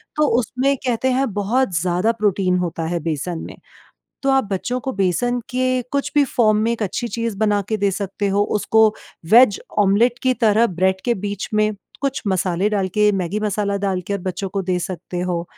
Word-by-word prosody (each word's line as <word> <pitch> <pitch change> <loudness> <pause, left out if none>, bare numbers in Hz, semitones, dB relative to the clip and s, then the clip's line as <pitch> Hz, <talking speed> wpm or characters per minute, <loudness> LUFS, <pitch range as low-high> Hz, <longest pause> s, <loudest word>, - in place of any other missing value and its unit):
तो 300 0 +3
उसमें 255 +4 0
कहते 255 +1 +1
हैं 270 +2 +1
बहुत 205 +4 0
ज़्यादा 180 +6 +1
प्रोटीन 195 -4 +1
होता 170 -2 -2
है 170 0 -1
बेसन 165 +1 -3
में। - - -10 0.7
तो 275 - +2
आप 270 0 +3
बच्चों 245 +6 -2
को 265 +1 -4
बेसन 200 +6 0
के 255 0 0
कुछ 280 0 -1
भी 290 - +6
फॉर्म 220 -4 +2
में 230 - +1
एक 230 -2 -2
अच्छी 210 +4 -2
चीज़ 230 -2 -3
बना 205 -1 +2
के 220 - 0
दे 200 -1 +1
सकते 200 +1 -3
हो 200 +1 +2 0.2
उसको 220 +1 +4 0.4
वेज 235 -2 +6 0.2
ऑमलेट 220 +5 +3
की 255 - +3
तरह 230 -1 +3
ब्रेड 190 0 0
के 240 - +3
बीच 200 -1 -4
में 215 0 +2 0.3
कुछ 275 -1 -1
मसाले 190 +1 0
डाल 200 -3 0
के, 210 +2 +2
मैगी 195 +1 -2
मसाला 205 -1 -1
डाल 195 -2 -1
के 200 - -1
बच्चों 185 +1 -4
को 195 +1 -2
दे 180 -1 0
सकते 180 0 -5
हो। 175 -1 -2
205 Hz, 195 wpm, -20 LUFS, 185-235 Hz, 0.7 s, भी